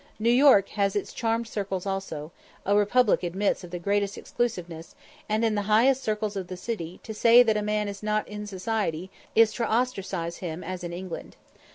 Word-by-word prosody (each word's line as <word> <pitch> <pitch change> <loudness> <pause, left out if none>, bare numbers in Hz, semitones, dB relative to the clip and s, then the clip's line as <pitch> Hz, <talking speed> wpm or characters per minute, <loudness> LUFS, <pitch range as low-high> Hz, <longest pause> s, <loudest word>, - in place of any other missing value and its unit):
New 230 +2 +2
York 245 -6 +6
has 200 -1 0
its 205 - -2
charmed 230 0 -1
circles 195 -3 -3
also; 190 -6 -4 0.3
a 200 - +3
republic 210 +3 +3
admits 190 +3 -1
of 180 - -9
the 175 - -5
greatest 200 +2 -1
exclusiveness; 175 -9 -4 0.3
and, 215 +2 +1
in 220 - +2
the 205 - 0
highest 250 +5 +4
circles 215 -2 -2
of 190 -2 -4
the 185 - -7
city, 180 -5 -5
to 220 - -6
say 235 +3 +7
that 220 -3 +2
a 210 - 0
man 210 0 -1
is 200 -1 -6
not 215 0 -1
in 210 0 -7
society, 190 -3 -2 0.2
is 225 -1 +5
to 235 - -2
ostracise 195 -8 -1
him 170 -1 -5
as 185 +1 -5
in 175 - -4
England. 180 0 -7
205 Hz, 195 wpm, -26 LUFS, 185-220 Hz, 0.3 s, say